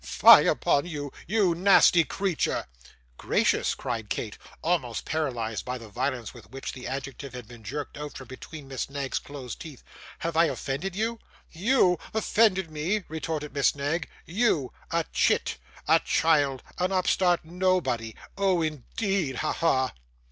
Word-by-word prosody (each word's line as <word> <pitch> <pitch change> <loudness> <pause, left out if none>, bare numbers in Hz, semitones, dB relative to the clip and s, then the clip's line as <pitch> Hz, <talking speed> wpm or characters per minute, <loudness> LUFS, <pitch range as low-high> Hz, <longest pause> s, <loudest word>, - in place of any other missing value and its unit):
Fie - - +8
upon 145 +4 +2
you, 145 -4 -5
you 195 -2 +3
nasty 175 -1 +6
creature!' 190 -1 -1 0.5
'Gracious!' - - +2
cried 110 -3 -4
Kate, 105 -3 -3 0.3
almost 155 -9 0
paralysed 120 -9 -2
by 125 0 -4
the 115 -3 -11
violence 125 0 -2
with - - -14
which 135 +1 -6
the 125 -1 -7
adjective 135 -1 -6
had 125 -3 -8
been 120 -2 -13
jerked 140 +6 -5
out 150 0 -6
from 130 - -10
between 140 +3 -10
Miss 135 0 -4
Knag's 140 -1 -2
closed 135 -4 -8
teeth; 155 -6 -10 0.3
'have 165 -1 -3
I 165 +1 +6
offended 155 +5 -3
you?' 225 +2 -1 0.3
'YOU 185 -1 +3 0.2
offended 205 -5 +2
me!' 175 +7 -1
retorted 155 -1 -4
Miss 140 -1 +2
Knag, 145 +4 -2 0.2
'YOU! 170 - +1 0.2
a 170 -1 0
chit, - - +2 0.3
a 160 +2 +6
child, 145 -6 +2 0.2
an 180 +1 +1
upstart 180 -2 +2
nobody! 160 -11 0 0.2
Oh, 190 -4 +3
indeed! 155 - -2
Ha, 155 - -1
ha! 130 -7 +1
155 Hz, 150 wpm, -27 LUFS, 130-180 Hz, 0.5 s, Fie